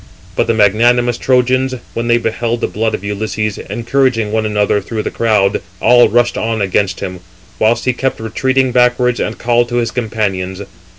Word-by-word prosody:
But - - +1
the 115 - +1
magnanimous 120 +3 +3
Trojans, 130 0 +1 0.2
when 115 0 -3
they 120 0 +4
beheld 115 0 -2
the - - 0
blood 110 +1 -1
of - - -9
Ulysses, 105 +1 -3
encouraging 120 -2 0
one 110 0 0
another 105 -1 +1
through 110 -2 -4
the - - -3
crowd, 105 -4 +1 0.2
all 120 +1 +5
rushed 120 +1 +1
on 115 0 -1
against 100 0 0
him; 90 0 -5 0.4
whilst 110 +2 +2
he 130 - +2
kept 135 +2 -2
retreating 130 +3 0
backwards, 125 0 +2
and 110 - -3
called 120 0 +1
to 120 - -3
his 120 -2 0
companions. 100 -5 -3
115 Hz, 175 wpm, -15 LUFS, 105-120 Hz, 0.4 s, all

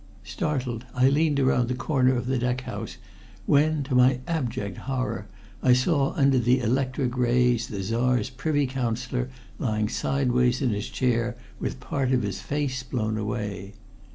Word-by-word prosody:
Startled, 125 - -2
I 125 +1 +5
leaned 145 0 +2
around 130 -2 +3
the 125 - -1
corner 130 0 +2
of 120 - -2
the 130 0 0
deck 125 +1 0
house, 105 -1 -6 0.5
when, 150 +1 +3
to 135 0 -4
my 125 0 +4
abject 120 - -2
horror, 125 -6 -2 0.3
I 125 - +5
saw 135 +2 +2
under 135 -3 +3
the 125 +1 +3
electric 130 +1 0
rays 125 -1 +2
the 100 -3 -4
Czar's 120 +3 +1
Privy 145 +3 0
Councillor 125 0 -2 0.3
lying 110 -3 0
sideways 125 -2 +1
in 130 -4 +1
his 105 +1 -3
chair 120 -1 0 0.2
with - - -3
part 130 +1 -1
of 125 - +2
his 100 -2 -3
face 140 -3 -2
blown 115 -4 -2
away. 105 -2 -4
125 Hz, 155 wpm, -26 LUFS, 120-135 Hz, 0.5 s, I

